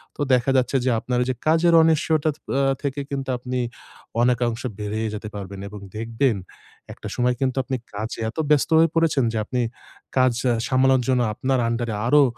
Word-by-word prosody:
তো -, -, -6 dB
দেখা 125 Hz, +1 st, +3 dB
যাচ্ছে 130 Hz, +1 st, +1 dB
যে -, -, +3 dB
আপনার 125 Hz, +2 st, -2 dB
ওই -, -, -5 dB
যে 130 Hz, -, 0 dB
কাজের 165 Hz, +2 st, +4 dB
অনিশ্চয়তা 160 Hz, -1 st, +2 dB, 0.3 s
আ -, -, +2 dB, 0.2 s
থেকে 140 Hz, 0 st, -2 dB
কিন্তু 135 Hz, -1 st, -4 dB
আপনি 125 Hz, +1 st, -3 dB, 0.6 s
অনেকাংশ 120 Hz, -1 st, +1 dB, 0.2 s
বেড়িয়ে 105 Hz, +2 st, -2 dB
যেতে 105 Hz, 0 st, -6 dB
পারবেন 100 Hz, -1 st, -7 dB
এবং 105 Hz, 0 st, -9 dB, 0.2 s
দেখবেন 115 Hz, +2 st, 0 dB, 0.6 s
একটা -, -, -9 dB
সময় 125 Hz, 0 st, +1 dB
কিন্তু 130 Hz, -1 st, 0 dB
আপনি 130 Hz, +1 st, -3 dB, 0.2 s
কাজে 110 Hz, +3 st, -5 dB
এত 115 Hz, -, -12 dB
ব্যস্ত 150 Hz, 0 st, +3 dB
হয়ে 165 Hz, 0 st, +5 dB
পড়েছেন। 165 Hz, -5 st, +3 dB
যে -, -, -1 dB
আপনি 125 Hz, +2 st, -1 dB, 0.6 s
কাজ 130 Hz, -1 st, +4 dB, 0.3 s
সামলানোর 130 Hz, 0 st, +3 dB
জন্য 125 Hz, -1 st, +3 dB
আপনার 130 Hz, +4 st, 0 dB
আন্ডার 115 Hz, 0 st, -1 dB
এ -, -, -2 dB
আরো 145 Hz, +3 st, +6 dB
125 Hz, 180 wpm, -23 LUFS, 115-140 Hz, 0.6 s, আরো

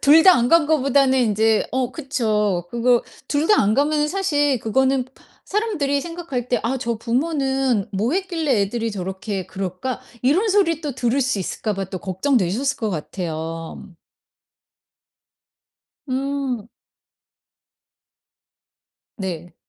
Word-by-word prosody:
2 310 Hz, +3 st, +7 dB
다 375 Hz, -, +9 dB
안 240 Hz, -3 st, +2 dB
간 330 Hz, -3 st, +5 dB
거보다는 275 Hz, -3 st, +3 dB
인제 220 Hz, -1 st, +2 dB
어 255 Hz, -2 st, -1 dB
그쵸. 215 Hz, -, 0 dB
그거 240 Hz, 0 st, +3 dB, 0.3 s
2 295 Hz, +2 st, +1 dB
다 420 Hz, -, +5 dB
안 210 Hz, +1 st, +2 dB
가면은 295 Hz, +2 st, +2 dB
사실 290 Hz, -7 st, +1 dB
그거는 260 Hz, +3 st, +1 dB, 0.4 s
사람들이 375 Hz, -10 st, 0 dB
생각할 330 Hz, -7 st, -5 dB
때 245 Hz, -, +2 dB
'아 245 Hz, +4 st, 0 dB
저 235 Hz, -3 st, -2 dB
부모는 265 Hz, -, 0 dB
뭐 215 Hz, +7 st, 0 dB
했길래 330 Hz, -, 0 dB
애들이 225 Hz, +3 st, -1 dB
저렇게 190 Hz, 0 st, -4 dB
그럴까?' 190 Hz, +7 st, -4 dB, 0.2 s
이런 325 Hz, -, +3 dB
소리 375 Hz, -6 st, +2 dB
또 295 Hz, -5 st, -4 dB
들을 245 Hz, +2 st, +1 dB
수 260 Hz, -5 st, 0 dB
있을까봐 195 Hz, +1 st, -3 dB
또 185 Hz, 0 st, -6 dB
걱정되셨을 215 Hz, +6 st, 0 dB
것 220 Hz, -2 st, -2 dB
같아요. 165 Hz, -1 st, -5 dB, 2.2 s
음. 265 Hz, -4 st, -2 dB, 2.5 s
네. 175 Hz, -4 st, -5 dB
255 Hz, 225 characters per minute, -21 LUFS, 210-290 Hz, 2.5 s, 다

